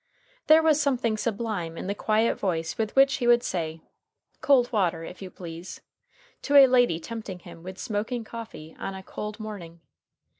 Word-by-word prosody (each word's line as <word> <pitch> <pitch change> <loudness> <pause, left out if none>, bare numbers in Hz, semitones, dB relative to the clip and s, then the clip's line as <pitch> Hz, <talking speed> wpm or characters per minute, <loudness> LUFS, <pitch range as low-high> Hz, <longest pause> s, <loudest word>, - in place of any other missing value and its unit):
There 315 +1 +7
was 310 -1 +4
something 250 -6 +1
sublime 210 -7 -3
in - - -5
the 200 - -1
quiet 215 +2 +1
voice 165 -4 -1
with 220 -1 -3
which 270 0 +5
he 245 - -1
would 240 0 +5
say, 160 -2 -3 0.6
"Cold 255 -3 +4
water, 175 -7 0
if 180 - -9
you 190 - -7
please," 170 0 -9 0.6
to 285 - -1
a 280 -1 +11
lady 245 -9 +3
tempting 215 0 -7
him 170 -1 -13
with 185 +2 -8
smoking 225 +2 -3
coffee 220 -9 -9
on 195 - -4
a 190 - -8
cold 210 +3 -6
morning. 190 -6 -8
215 Hz, 175 wpm, -26 LUFS, 180-240 Hz, 0.6 s, a